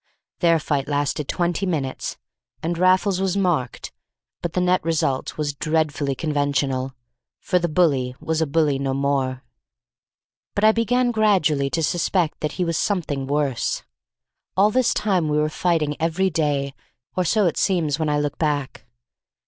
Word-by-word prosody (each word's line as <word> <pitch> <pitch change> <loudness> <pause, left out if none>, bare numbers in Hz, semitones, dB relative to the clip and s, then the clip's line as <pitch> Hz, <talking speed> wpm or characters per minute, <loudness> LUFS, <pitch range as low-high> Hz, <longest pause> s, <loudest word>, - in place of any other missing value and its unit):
Their 170 -2 +4
fight 145 -3 -1
lasted 145 0 -1
twenty 175 +2 -1
minutes, 140 -7 -3 0.5
and 170 +2 -1
Raffles 185 +2 +3
was 195 0 0
marked, 170 -11 -1 0.5
but 175 - -3
the - - 0
net 180 0 +2
result 155 -5 -1
was 150 -2 -1
dreadfully 150 -2 0
conventional, 140 -3 -1 0.4
for 180 - +1
the 175 0 -1
bully 140 -7 +2
was 160 0 -1
a 160 - +1
bully 145 -2 +1
no 135 -1 -1
more. 135 -2 -1 1.1
But 205 - 0
I 215 - +7
began 240 +2 +1
gradually 185 -11 +2
to 165 +3 -1
suspect 175 +1 0
that 150 - -2
he 180 - -1
was 165 -2 -1
something 150 -9 -1
worse. 140 -3 -1 0.7
All 205 +3 +5
this 255 +1 +2
time 185 -7 +1
we 150 - +1
were 150 0 +2
fighting 155 -2 0
every 170 +4 +1
day, 145 -3 0 0.4
or 185 - +1
so 205 +4 +2
it 170 - +1
seems 165 -6 +1
when 155 -1 0
I 145 0 +1
look 145 0 -3
back. 145 -4 -2
155 Hz, 155 wpm, -22 LUFS, 145-180 Hz, 1.1 s, I